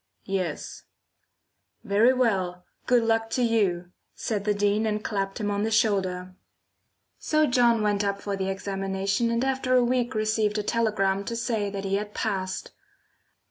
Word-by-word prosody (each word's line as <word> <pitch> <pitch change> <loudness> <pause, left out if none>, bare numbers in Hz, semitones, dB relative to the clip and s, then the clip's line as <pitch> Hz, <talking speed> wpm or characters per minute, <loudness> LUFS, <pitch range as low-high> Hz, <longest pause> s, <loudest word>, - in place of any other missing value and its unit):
"Yes." 190 -2 -4 1.0
"Very 220 +3 +4
well! 190 -8 0 0.2
Good 245 -2 +4
luck 225 0 +1
to 250 - +2
you!" 190 -7 +1 0.2
said 205 -3 -3
the 210 - +2
Dean, 205 +2 +1
and 210 0 -2
clapped 195 -2 -2
him 205 -1 -1
on 200 0 -1
the 220 - 0
shoulder. 190 -4 +1 0.9
So 310 0 +2
John 240 -4 +3
went 205 -1 +1
up 200 0 -1
for 200 0 -3
the 190 0 -2
examination 195 +3 -1
and 235 +2 0
after 265 -1 +1
a 250 - +5
week 245 0 0
received 215 0 +1
a 210 - -1
telegram 205 -4 +1
to 230 - -3
say 230 -3 -1
that 200 0 -5
he 195 0 +1
had 210 0 -6
passed. 190 -4 -3
210 Hz, 160 wpm, -26 LUFS, 195-230 Hz, 1.0 s, a